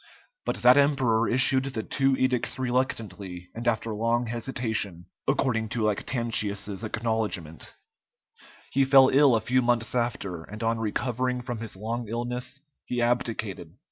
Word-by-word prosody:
But - - -3
that 125 +2 +7
emperor 130 -6 +3
issued 130 +1 +4
the 130 -5 -4
two 135 -1 +1
edicts 130 -2 +1
reluctantly 105 -8 -3
and 115 +1 -6
after 115 -1 0
long 115 +3 0
hesitation, 110 -7 -2 0.2
according 115 -4 +1
to 115 -1 -2
Lactantius's 105 -2 -1
acknowledgment: 110 -8 -3 1.0
he 135 - +3
fell 135 0 +7
ill 140 -3 +5
a 110 - +1
few 125 +4 +2
months 120 -1 +1
after, 100 -8 -2
and 105 +6 -8
on 115 0 0
recovering 125 +3 -1
from 120 -2 -5
his 110 -3 -5
long 115 +4 -4
illness 125 +4 -3 0.2
he 125 - -3
abdicated. 110 -8 -2
115 Hz, 140 wpm, -26 LUFS, 110-125 Hz, 1.0 s, that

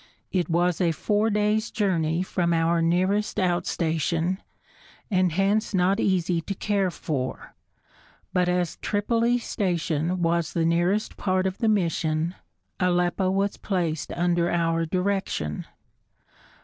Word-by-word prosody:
It 180 -2 0
was 175 +1 +1
a 170 -2 +2
four 210 +8 +1
days' 210 +1 +1
journey 175 -5 0
from 175 -2 0
our 165 +1 +2
nearest 185 +6 +1
outstation, 175 -1 0 0.7
and 185 -2 +3
hence 200 +3 +1
not 190 +3 +2
easy 180 -4 +1
to 195 +4 -5
care 200 -1 0
for; 140 -7 -4 0.8
but 180 -1 +2
as 180 -2 0
Tripoli 230 +3 +1
Station 175 -5 -1
was 170 0 +1
the 165 -1 +1
nearest 175 +6 +1
part 185 -1 0
of 190 0 -2
the 225 - +2
mission, 165 -4 0 0.5
Aleppo 180 +1 +1
was 195 +1 0
placed 170 -6 -2
under 175 0 +1
our 165 -1 +1
direction. 185 - -2
180 Hz, 125 wpm, -25 LUFS, 165-195 Hz, 0.8 s, and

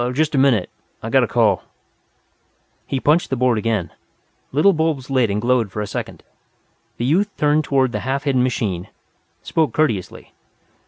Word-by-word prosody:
"Just 155 +3 0
a 135 - +2
minute. 125 -9 +2 0.3
I've - - -4
got - - +5
a - - 0
call." - - +2 1.3
He 135 - -2
punched 155 +6 +2
the 135 - 0
board 125 -3 +2
again. 105 -6 -1 0.6
Little 155 +9 +4
bulbs 155 -5 -1
lit 130 -4 +2
and 100 +1 -1
glowed 120 -3 +1
for 105 - -5
a 105 - -2
second. - - -6 0.7
The 120 - -2
youth 185 +10 +2
turned 150 +1 +2
toward 130 -3 +1
the - - -3
half 135 +2 -2
hidden 135 -3 +1
machine, 105 -8 -1 0.6
spoke 160 -2 0
courteously. 115 - -2
130 Hz, 165 wpm, -20 LUFS, 115-150 Hz, 1.3 s, got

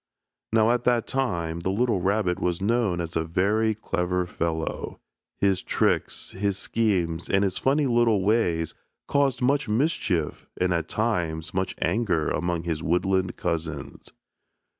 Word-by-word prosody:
Now, 110 +1 +4
at 120 0 +1
that 120 -2 +3
time, 85 -12 -1
the 85 - -2
little 110 -1 +1
rabbit 95 -1 +1
was 90 -1 0
known 105 -3 +1
as 85 -1 -4
a 80 - +1
very 105 +6 +1
clever 90 -3 -1
fellow. 80 -2 -3 0.4
His 95 -2 +2
tricks, - - 0
his 100 0 -1
schemes, 90 -8 0
and 95 +1 +3
his 95 -2 -1
funny 140 +2 +2
little 120 -5 +3
ways 90 -7 +1 0.3
caused 140 -3 +1
much 135 -2 +2
mischief 110 - 0
and 90 0 +2
at 85 -1 -2
times 85 -8 -1
much 95 0 -1
anger 95 -9 +1
among 85 +1 -1
his 80 -2 -2
woodland 95 +2 0
cousins. 80 -4 -4
95 Hz, 140 wpm, -25 LUFS, 85-115 Hz, 0.4 s, Now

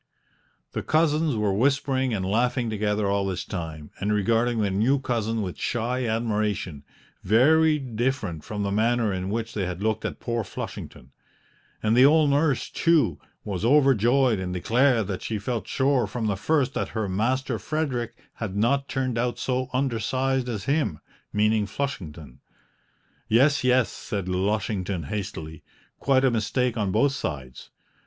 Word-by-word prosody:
The - - -3
cousins 155 -2 +2
were 105 -2 +1
whispering 130 +2 +1
and 95 -4 -1
laughing 120 +3 +1
together 105 0 0
all 100 0 +1
this 90 -2 -3
time 80 -5 -6
and 105 +1 -1
regarding 115 +3 +1
their 100 -2 +1
new 115 +9 +2
cousin 115 -4 -1
with 90 -3 -6
shy 120 +2 -1
admiration, 105 -8 -1 0.4
very 155 +9 +4
different 120 - -2
from 105 -1 -4
the 100 - -1
manner 110 0 +1
in 95 0 -3
which 115 +2 -3
they 100 -4 -1
had 90 +2 -5
looked 110 0 0
at - - -4
poor 115 -1 -2
Flushington; 70 -8 -8 0.7
and 110 +1 +3
the 125 - +7
old 150 +1 +5
nurse, 145 -2 +1
too, 150 - +2 0.2
was 100 -2 -4
overjoyed 130 -3 +4
and 90 -1 -3
declared 120 +4 +2
that 95 -1 -4
she 110 - -3
felt 115 +2 -3
sure 130 -4 +1
from 115 +2 -3
the 105 -2 +1
first 140 - +1
that - - -2
her 110 -2 0
Master 115 +5 -1
Frederick 125 -2 -2 0.2
had 105 -4 -5
not 135 +6 +1
turned 130 -3 -1
out 120 0 -1
so 130 0 -1
undersized 130 0 0
as 105 -4 -3
him 135 - 0 0.3
meaning 105 0 +2
Flushington. 80 - -5 0.9
"Yes, 140 +6 +4
yes," 125 -1 +3
said 100 -3 -5
Lushington 95 -1 -1
hastily, 80 -3 -5 0.4
"quite 135 -1 +3
a 130 - +4
mistake 120 +2 0
on 105 -4 -1
both 115 +8 +3
sides. 70 - -6
115 Hz, 155 wpm, -25 LUFS, 100-130 Hz, 0.9 s, the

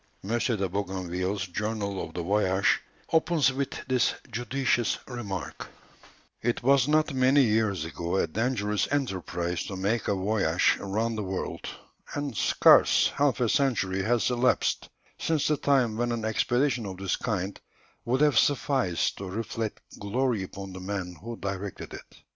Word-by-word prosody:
M. 110 +5 -1
de 110 -6 0
Bougainville's 95 0 -2
journal 100 +1 -3
of - - -9
the 85 - -2
voyage 95 0 +2 0.3
opens 160 -4 +3
with 135 0 -4
this 130 -2 +2 0.2
judicious 120 +1 0
remark: 105 -8 -5 0.7
"It 120 +1 -1
was 135 0 +4
not 155 -1 +2
many 130 +2 +4
years 105 -7 +1
ago 85 +2 -3
a - - +3
dangerous 105 0 0
enterprise 90 -10 -2
to 100 - -5
make 100 +4 -1
a 100 - +2
voyage 100 +2 +2
round 110 +3 -1
the - - -2
world, 95 -1 -4 0.5
and 145 -4 -3
scarce - - +5
half 140 -3 +2
a 120 - +3
century 100 -8 +1
has 120 +4 +1
elapsed 125 +1 +1 0.3
since 160 -3 +1
the 150 - +3
time 130 -6 +2
when 120 0 0
an 115 -2 -2
expedition 120 +2 +1
of 95 -1 -6
this 95 -1 -1
kind 100 -3 -3 0.4
would 130 +4 0
have 150 -2 +5
sufficed 135 - +1
to 95 -1 -5
reflect 110 +2 -4 0.2
glory 115 +2 0
upon 95 0 -7
the 95 - -7
man 95 -2 -4
who 115 +2 -6
directed 100 0 -5
it. - - -12
110 Hz, 150 wpm, -27 LUFS, 95-130 Hz, 0.7 s, scarce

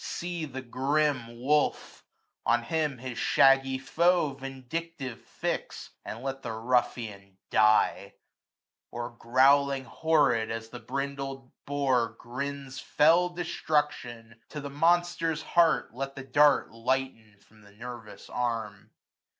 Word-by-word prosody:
See 175 -2 -4
the 130 -2 -7
grim 130 -2 0
wolf; 145 +4 0 0.4
on 120 - +2
him 150 -1 -1
his 125 0 -6
shaggy 135 0 +4
foe 170 +2 +2
465 135 - -17
Vindictive 135 0 -6
fix, - - -5
and 115 +3 -7
let 135 0 -4
the 115 - -5
ruffian 110 -4 -2
die: 110 0 +3 0.7
Or, 120 0 -5
growling 135 +3 +3
horrid, 130 -4 +2
as 115 0 -5
the 125 - -8
brindled 135 -1 -5 0.2
boar 130 -5 +1
Grins 135 +2 -6
fell 170 +4 +4
destruction, 145 -9 -2
to 150 - -6
the 140 -1 -6
monster's 165 +1 +1
heart 170 -8 +2
Let 135 +2 -5
the 135 - -7
dart 145 +2 +4
lighten 115 -2 -2
from 110 +1 -23
the 100 0 -18
nervous 115 0 -9
arm. 115 -5 -3
135 Hz, 120 wpm, -28 LUFS, 120-150 Hz, 0.7 s, shaggy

